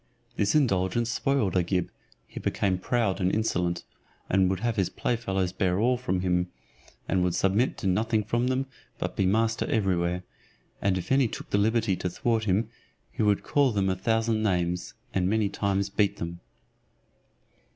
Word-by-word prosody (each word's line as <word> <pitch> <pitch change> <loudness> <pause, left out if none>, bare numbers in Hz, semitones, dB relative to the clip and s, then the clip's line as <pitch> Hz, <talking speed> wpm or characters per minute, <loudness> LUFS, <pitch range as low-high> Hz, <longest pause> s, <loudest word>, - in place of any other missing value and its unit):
This 100 +5 +1
indulgence 115 -3 +2
spoiled 135 -11 0
Agib; 90 0 +1 0.4
he - - -9
became 95 -3 0
proud 105 -2 0
and 90 +1 +2
insolent, 90 -6 0 0.5
would 95 -1 +2
have 120 -2 0
his 95 -3 +1
play 120 - -1
fellows 95 -5 -1
bear 95 -2 +1
all 125 +3 +3
from 105 -7 -1
him, 90 -1 +1 0.6
and 95 - +1
would 90 -1 0
submit 100 +7 +1
to - - -7
nothing 110 +4 +1
from 120 +4 0
them, 130 +1 0 0.3
but - - -3
be 95 - +2
master 110 +3 +1
every 95 -5 +1
where; 85 +1 -1 0.6
and 95 -2 +2
if 90 +4 -5
any 135 -2 +4
took - - -8
the 100 - +3
liberty 110 -1 +2
to 90 - -2
thwart 110 +4 0
him, 100 +3 +1 0.4
he - - -4
would 105 -2 +2
call 140 -3 +2
them 100 -3 +1
a - - 0
thousand 110 +3 +1
names, 90 -4 -1 0.2
and 90 -1 +1
many 110 -1 +1
times 100 0 -1
beat 100 0 +1
them. 85 +1 -5
100 Hz, 170 wpm, -27 LUFS, 90-115 Hz, 0.6 s, any